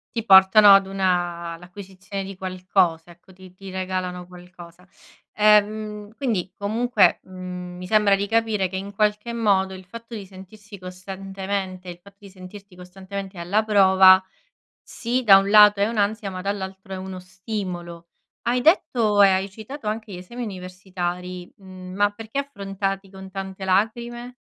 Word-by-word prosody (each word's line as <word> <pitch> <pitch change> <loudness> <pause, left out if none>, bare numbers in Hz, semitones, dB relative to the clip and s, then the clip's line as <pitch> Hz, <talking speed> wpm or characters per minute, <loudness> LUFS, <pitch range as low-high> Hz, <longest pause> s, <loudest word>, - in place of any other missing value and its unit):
Ti 230 -1 -3
portano 195 +1 +8
ad 195 -1 +3
una 175 -3 -2
l'acquisizione 190 +2 -9
di 195 -1 -9
qualcosa, 185 -3 -1
ecco. 175 +2 -18
Ti 185 0 -15
ti 195 0 -10
regalano 185 -1 -4
qualcosa. 180 0 -15 0.5
Ehm, 210 0 +2
quindi 220 -10 -2
comunque, 230 +5 +2
mhmm, 180 -1 -8
mi 180 - -8
sembra 210 -1 +4
di 200 +1 -3
capire 220 -3 +1
che 190 - -7
in 200 +1 -7
qualche 210 +3 0
modo 195 -4 +1
il 185 -1 -11
fatto 230 +4 -11
di 200 -4 -7
sentirsi 200 +2 -13
costantemente 190 0 -6
il 175 - -8
fatto 200 +2 -19
di 200 - -14
sentirti 190 +1 -13
costantemente 190 +1 -9
alla 200 +6 0
prova, 190 -2 +6 0.6
sì 250 +2 -3
da 200 -4 +8
un 195 +1 0
lato 210 -1 +7
è 200 - +2
un'ansia, 215 -1 -1
ma 185 -1 -6
dall'altro 190 -1 -5
è 190 - -4
uno 190 0 -7
stimolo. 180 -3 -7 0.3
Hai 245 +1 0
detto 235 - +3
e 195 - +7
hai 190 +1 0
citato 220 +5 -9
anche 215 0 -4
gli 180 - -7
esami 235 +7 -8
universitari, 180 -2 -6
mhmm, 185 -1 -11
ma 205 0 +2
perché 225 +4 -8
affrontati 195 -7 -4
con 190 0 -12
tante 190 0 -6
lacrime? 235 +5 -1
195 Hz, 155 wpm, -23 LUFS, 185-210 Hz, 0.6 s, portano